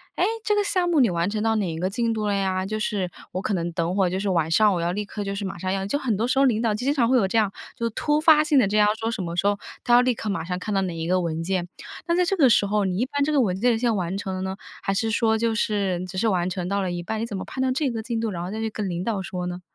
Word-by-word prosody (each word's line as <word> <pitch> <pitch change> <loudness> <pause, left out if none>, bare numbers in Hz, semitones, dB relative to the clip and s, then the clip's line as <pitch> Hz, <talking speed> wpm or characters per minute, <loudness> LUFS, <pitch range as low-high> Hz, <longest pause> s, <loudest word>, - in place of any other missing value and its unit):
“诶， - - +2 0.2
这 425 - +1
个 415 - +2
项 365 -3 +1
目 330 -3 +3
你 245 -5 +5
完 170 +1 0
成 210 0 -2
到 225 0 +2
哪 200 -6 0
一 160 - -5
个 185 +2 0
进 230 +3 0
度 215 -1 -2
了 205 - +1
呀？” 190 -1 0
就 215 +2 -2
是 200 -4 -1 0.2
我 185 - -3
可 205 - -1
能 175 -2 -1
等 170 +1 -1
会 190 -2 +2
就 185 +2 -2
是 200 - -2
晚 165 -3 +1
上 210 +4 +5
我 175 - -1
要 170 +1 0
立 205 +3 -3
刻 205 +1 -5
就 200 0 -3
是 200 0 -4
马 190 - -5
上 185 +2 -3
要， 195 0 -2
就 200 +8 0
很 255 -7 -1
多 225 +4 0
时 260 - 0
候 275 - +5
领 230 -4 +2
导 225 -2 +1
经 255 +6 0
常 250 -6 +2
会 260 - +4
有 205 -6 +2
这 210 - 0
样， 210 -3 +2 0.2
就 235 - -3
是 - - +1
突 295 +7 +1
发 310 -1 +6
性 305 -3 +3
的 215 - +3
这 210 +2 0
样 210 0 +5
说 225 - -1
什 230 -3 -3
么 170 -1 -4
时 185 +3 +1
候， 205 0 +2 0.3
他 240 - +2
要 240 - +8
立 250 0 +2
刻 220 -1 -5
马 200 - -2
上 180 +2 -3
看 210 +3 -4
到 195 - +2
哪 180 -3 -3
一 165 0 -4
个 185 +1 +2
文 165 -2 -2
件。 180 0 -1 0.4
那 340 - +2
在 360 0 +3
这 390 - +1
个 285 -8 +5
时 210 - +4
候 205 0 +1
你 185 -1 -1
一 240 - +1
般 285 +2 -1
这 300 - 0
个 295 - +3
文 190 -7 +1
件 245 +3 +3
已 - - 0
经 230 -1 +1
完 185 -1 -2
成 195 -1 -4
了 185 - -4
呢？ 190 0 -4 0.3
还 195 - 0
是 225 +3 0
说 220 0 +2
就 225 0 0
是 200 -5 0
只 185 - -7
是 225 - +1
完 180 -4 +1
成 180 -1 -3
到 200 +1 0
了 185 -2 -2
一 175 0 -3
半， 220 +5 -4
你 - - -1
怎 215 -4 -5
么 - - -5
判 260 - -5
断 260 -1 +1
这 275 +1 0
个 225 -2 -4
进 235 -1 -2
度， 225 0 -1
然 175 -4 -4
后 180 - -5
再 220 - -4
去 225 0 -1
跟 210 -2 -4
领 175 0 -3
导 215 -4 -1
说 180 -3 -4
呢？ 180 0 -5
205 Hz, 380 characters per minute, -24 LUFS, 185-230 Hz, 0.4 s, 要